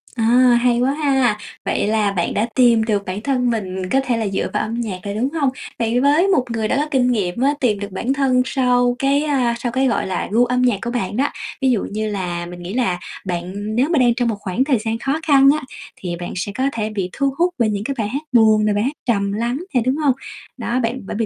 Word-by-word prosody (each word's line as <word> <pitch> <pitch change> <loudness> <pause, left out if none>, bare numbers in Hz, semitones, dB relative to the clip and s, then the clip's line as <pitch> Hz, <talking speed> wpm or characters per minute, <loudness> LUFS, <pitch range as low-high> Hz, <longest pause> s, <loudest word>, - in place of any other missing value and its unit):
À, 225 - -1 0.4
hay 240 -1 +2
quá 260 +2 +2
ha, 265 -7 +1 0.3
vậy - - 0
là 215 -2 +1
bạn 175 -3 -1
đã 220 +3 0
tìm 235 -3 +5
được 205 -3 -1
bản 185 +3 -4
thân 250 -2 0
mình 190 -4 -3
có 270 - +3
thể 240 -2 0
là 220 -2 -1
dựa 195 - -1
vào - - 0
âm 230 +2 -3
nhạc 195 -5 -4
rồi, 200 0 -4
đúng 250 +5 0
hông? 285 -5 +1 0.3
Vậy 230 +1 +1
với 295 +7 +3
một 350 -10 +2
người 220 -1 -1
đã - - 0
có 295 - +1
kinh 250 -2 +2
nghiệm 205 0 -1
á 280 +2 +3
tìm 215 -6 +1
được 200 -1 -6
bản 240 +8 -1
thân 265 -2 +2
sau 245 -2 +2
cái, 280 +2 +2
a, 255 -6 +1
sau 240 -1 -2
cái 265 +1 +1
gọi 235 - 0
là 185 - -2
gu 240 +3 +4
âm 250 +1 0
nhạc 245 -5 +2
của 235 +1 -3
bạn 230 -3 -2
đó, 280 +2 +2 0.3
ví 260 -1 +3
dụ 225 - +1
như 215 +1 -2
là 175 -4 -3
mình 175 0 -9
nghĩ 185 +4 -6
là 210 -8 0 0.3
bạn 190 +4 -4
nếu 265 +6 +2
mà 320 -5 +2
đang 240 -2 +4
trong 245 -1 0
một 225 - 0
khoảng 200 +6 -1
thời 270 -4 +2
gian 225 +1 -2
khó 275 +5 -1
khăn 275 -1 +6
á, - - -12 0.3
thì 175 -2 -5
bạn 175 - -5
sẽ 195 +2 -3
có 260 - -1
thể 215 -1 -2
bị 195 -4 -3
thu 275 -1 0
hút 350 +1 +2
bởi 225 -2 +3
những 205 0 -2
cái 275 +3 -3
bài 215 -2 -1
hát 280 +5 -3
buồn 220 -3 +5
nè, 210 - +2
bài 205 +1 0
hát 275 +4 -1
trầm 200 -4 +1
lắng 235 +4 -1 0.2
nè, 245 - +3
đúng 260 +2 +2
hông? 290 -4 +2 0.4
Đó, 240 +2 -1
bạn 240 +2 -2
bởi - - -5
vì 225 - +1
235 Hz, 265 wpm, -20 LUFS, 205-260 Hz, 0.4 s, khăn